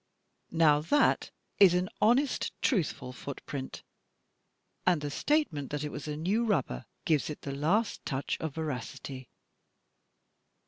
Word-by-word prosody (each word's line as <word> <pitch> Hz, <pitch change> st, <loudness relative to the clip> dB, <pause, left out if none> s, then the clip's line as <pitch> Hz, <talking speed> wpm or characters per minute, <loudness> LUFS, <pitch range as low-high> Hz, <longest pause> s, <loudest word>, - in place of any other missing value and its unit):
Now 160 Hz, -3 st, +5 dB
that 290 Hz, -, +3 dB, 0.3 s
is 190 Hz, -3 st, +8 dB
an 180 Hz, +1 st, +1 dB
honest, 250 Hz, +6 st, +3 dB
truthful 165 Hz, -, 0 dB
footprint, 135 Hz, +1 st, -6 dB, 1.0 s
and 180 Hz, -3 st, +3 dB
the 145 Hz, -1 st, -4 dB
state 295 Hz, -, +1 dB
ment 145 Hz, -2 st, -4 dB
that 145 Hz, 0 st, -3 dB
it 150 Hz, -, -3 dB
was 150 Hz, -, -6 dB
a 150 Hz, 0 st, -3 dB
new 195 Hz, +9 st, +1 dB
rubber 140 Hz, -, 0 dB, 0.2 s
gives 155 Hz, -3 st, +2 dB
it 150 Hz, -, -6 dB
the 140 Hz, -, -5 dB
last 170 Hz, +11 st, +1 dB
touch 135 Hz, +1 st, -2 dB
of 160 Hz, -4 st, -4 dB
veracity. 135 Hz, -3 st, -5 dB
155 Hz, 135 wpm, -30 LUFS, 140-195 Hz, 1.0 s, is